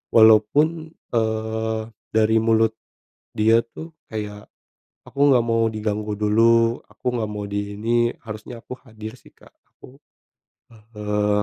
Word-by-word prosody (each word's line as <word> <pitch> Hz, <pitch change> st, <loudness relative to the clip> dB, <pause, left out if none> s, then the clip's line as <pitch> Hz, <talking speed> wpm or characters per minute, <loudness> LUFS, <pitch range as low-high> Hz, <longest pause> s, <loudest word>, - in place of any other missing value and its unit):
walaupun, 140 Hz, +9 st, +4 dB, 0.2 s
eee, 110 Hz, 0 st, -1 dB, 0.3 s
dari 110 Hz, 0 st, +4 dB
mulut 110 Hz, 0 st, +3 dB, 0.6 s
dia 110 Hz, +2 st, +4 dB
tuh 160 Hz, +7 st, -10 dB, 0.2 s
kayak, 105 Hz, -1 st, -6 dB, 0.6 s
aku 140 Hz, -, -11 dB
nggak 125 Hz, -3 st, +5 dB
mau 115 Hz, -1 st, +2 dB
diganggu 105 Hz, -1 st, -3 dB
dulu, 115 Hz, +2 st, +3 dB
aku -, -, -26 dB
nggak 110 Hz, -2 st, -2 dB
mau 105 Hz, -1 st, -5 dB
di 100 Hz, 0 st, -4 dB
ini, 115 Hz, +3 st, 0 dB, 0.3 s
harusnya 110 Hz, +2 st, -8 dB
aku -, -, -8 dB
hadir 110 Hz, -1 st, -9 dB
sih, -, -, -18 dB
Kak, -, -, -20 dB, 0.2 s
aku, 135 Hz, +3 st, -16 dB, 0.7 s
eee, 105 Hz, -2 st, -2 dB
110 Hz, 125 wpm, -22 LUFS, 105-115 Hz, 0.7 s, nggak